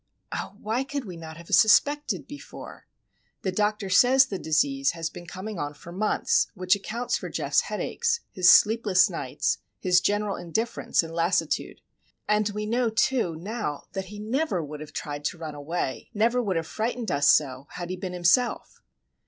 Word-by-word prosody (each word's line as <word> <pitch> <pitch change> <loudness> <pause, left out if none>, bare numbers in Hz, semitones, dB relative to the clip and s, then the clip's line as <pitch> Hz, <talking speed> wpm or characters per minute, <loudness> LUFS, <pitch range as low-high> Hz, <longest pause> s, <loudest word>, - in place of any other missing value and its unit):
Oh, - - -5
why 225 +5 -1
could 280 -1 -4
we 185 -3 -7
not 160 -1 -9
have 170 - -11
suspected 290 +7 +4
before? 290 0 -11 0.6
The 190 - 0
doctor 210 +1 0
says 255 +8 +6
the 195 -7 -5
disease 275 - +1
has 165 -1 -4
been 175 -1 -10
coming 195 +2 -6
on 145 0 -4
for 170 - -12
months;—which 185 -1 +1
accounts 235 +4 -3
for - - -6
Geof's - - +1
headaches, 465 0 -1
his 180 -2 +4
sleepless 210 -4 +5
nights, - - -2 0.2
his 180 -1 +3
general 205 0 0
indifference 220 +3 -1
and 165 0 -8
lassitude. 170 +3 0 0.5
And 210 0 +2
we 210 +1 -4
know, 235 +2 +1
too, 225 -5 +1
now, 185 -3 -4
that 195 -1 -4
he 205 +2 -10
never 220 - -1
would 150 +1 -8
have 155 0 -9
tried 145 0 -5
to 175 - -2
run 160 -2 -6
away, 145 -1 -4
never 235 +4 +2
would 200 -6 -1
have 165 0 -1
frightened 225 +5 -3
us 140 0 +3
so, 135 -1 +2
had 175 0 -5
he - - -2
been 180 0 -6
himself. 180 +8 +1
195 Hz, 170 wpm, -26 LUFS, 170-230 Hz, 0.6 s, says